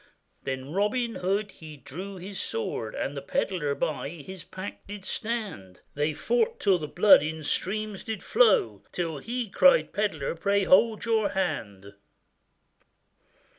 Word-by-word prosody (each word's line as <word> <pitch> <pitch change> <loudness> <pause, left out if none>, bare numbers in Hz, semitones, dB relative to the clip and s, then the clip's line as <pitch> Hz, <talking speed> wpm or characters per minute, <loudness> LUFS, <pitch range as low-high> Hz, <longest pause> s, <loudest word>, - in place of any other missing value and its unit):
Then 130 +1 -4
Robin 220 +6 0
Hood 200 +3 -1
he 155 -2 -11
drew 180 +9 -8
his 190 +2 -6
sword, 110 -1 -2
And 140 - -3
the 140 - -4
pedlar 150 0 -1
by 145 -2 -2
his 170 +2 -9
pack 190 +2 -8
did 205 -1 -8
stand, 205 - -3
They 150 +1 -1
fought 470 - 0
till 190 -3 +3
the 155 - -4
blood 190 +4 +6
in 155 +1 -4
streams 210 +6 -1
did 220 -3 -5
flow, 155 - +3
Till 165 -4 -3
he 240 - -3
cried, - - +4
'Pedlar, 195 -9 -1
pray 200 +3 +2
hold 215 +5 +4
your 220 -3 +2
hand! 110 - -3
185 Hz, 140 wpm, -27 LUFS, 145-210 Hz, -, blood